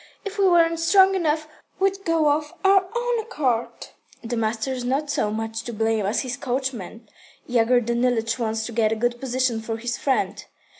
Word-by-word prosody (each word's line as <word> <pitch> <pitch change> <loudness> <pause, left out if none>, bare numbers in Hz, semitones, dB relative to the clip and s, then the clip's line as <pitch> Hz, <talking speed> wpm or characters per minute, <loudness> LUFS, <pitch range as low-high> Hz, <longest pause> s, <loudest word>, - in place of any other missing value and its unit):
If 405 +1 -6
we 390 - +5
weren't 335 -2 +4
strong 380 +3 +5
enough, 310 -4 0 0.3
we'd 390 0 0
go 320 -3 +3
of 300 +3 -2
our 385 -1 +5
own 480 0 0
accord." 280 - -1 0.5
"The 240 +1 -3
master's 230 +3 -2
not 280 +4 -1
so 210 - 0
much 225 +1 -3
to 240 - -5
blame 220 -2 0
as 210 - 0
his 250 -2 -4
coachman. 245 -4 -4 0.4
Yegor 245 0 +3
Danilych 235 0 0
wants 220 -1 -1
to 235 - -6
get 220 -1 +1
a - - +1
good 240 +2 -1
position 255 -3 -1
for 225 0 -4
his 240 +1 -4
friend." 270 -2 0
250 Hz, 180 wpm, -23 LUFS, 225-330 Hz, 0.5 s, we